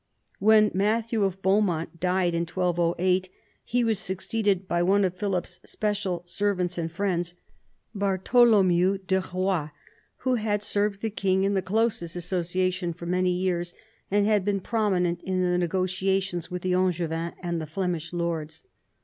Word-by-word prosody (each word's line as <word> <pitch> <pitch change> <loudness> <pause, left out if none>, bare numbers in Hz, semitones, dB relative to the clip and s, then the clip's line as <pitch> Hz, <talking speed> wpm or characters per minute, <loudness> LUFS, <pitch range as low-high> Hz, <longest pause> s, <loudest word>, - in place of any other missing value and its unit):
When 215 +1 +5
Matthew 220 +3 +1
of 190 -1 -2
Beaumont 185 -4 +1
died 180 0 +1
in 170 0 -1
1208, 180 +1 +1 0.3
he 245 +1 0
was 220 -3 +1
succeeded 195 0 -1
by 175 -1 +1
one 195 +3 +3
of 180 - -1
Philip's 185 -2 -3
special 200 -5 -2
servants 180 -1 -1
and 165 -1 -3
friends, 175 -2 -1 0.6
Bartholomew 195 -2 +3
de 190 0 +2
Eoie, 185 -4 -1 0.5
who 255 -1 0
had 210 -1 0
served 205 -1 -1
the 220 - -1
king 190 -2 +1
in 200 +1 +1
the 190 - +1
closest 200 -3 -1
association 180 0 -1
for 170 +1 -9
many 180 +1 +1
years, 180 -1 -1 0.3
and 205 +1 +2
had 210 -2 +3
been 200 0 0
prominent 185 -5 0
in 185 -1 -1
the 180 0 +1
negotiations 185 0 -1
with 180 -1 -5
the 185 0 +1
Angevins 170 -2 0
and 170 -1 -2
the 155 - -6
Flemish 170 0 -3
lords. 170 -3 -3
185 Hz, 150 wpm, -26 LUFS, 175-200 Hz, 0.6 s, When